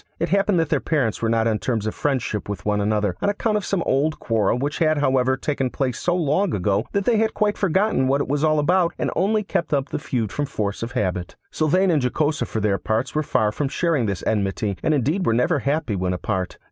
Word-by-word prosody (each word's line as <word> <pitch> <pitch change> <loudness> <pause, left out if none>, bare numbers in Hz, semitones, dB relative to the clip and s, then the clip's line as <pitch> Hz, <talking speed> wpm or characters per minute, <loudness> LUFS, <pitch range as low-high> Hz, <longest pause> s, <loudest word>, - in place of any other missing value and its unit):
It 170 +1 -1
happened 195 0 +2
that 165 -2 0
their - - +2
parents 135 -9 -1
were 115 - +1
not 115 0 +2
on 110 -2 0
terms 115 -4 -2
of 110 - -2
friendship 130 -8 -2
with 95 -3 -5
one 105 -1 +1
another, 105 -2 0
on - - +2
account 210 +1 0
of 210 - 0
some 190 -4 -1
old 150 +4 +1
quarrel, 110 -1 +1
which 145 +4 -2
had, 155 -2 +3
however, 130 -2 +2
taken 135 -2 -1
place 130 -1 -2
so 175 - 0
long 175 +2 +1
ago, 100 +3 0
that 200 -1 -1
they 235 -2 +3
had 220 0 +1
quite 210 -1 +1
forgotten 190 -6 +1
what 135 +2 +2
it 140 - -1
was 145 +2 -1
all 155 -1 +3
about, 175 +3 +2
and - - -1
only 210 +5 +1
kept 170 -5 -1
up 140 0 -1
the - - -3
feud 115 -7 -2
from 145 -1 -2
force 105 -5 -3
of 115 +2 -5
habit. 90 -7 -2 0.2
Sylvain 180 +5 +2
and 155 -4 +2
Jocosa 150 +4 0
for 110 - -3
their 100 -2 +1
parts 115 +3 -1
were 155 - +1
far 110 -7 +1
from 140 +6 -2
sharing 155 -7 0
this 100 -2 -3
enmity, 100 -1 -1
and 155 - +2
indeed 150 - 0
were 115 - +2
never 145 +6 +2
happy 140 -4 -1
when 90 -1 -1
apart. 90 0 -3
140 Hz, 240 wpm, -22 LUFS, 110-165 Hz, 0.2 s, had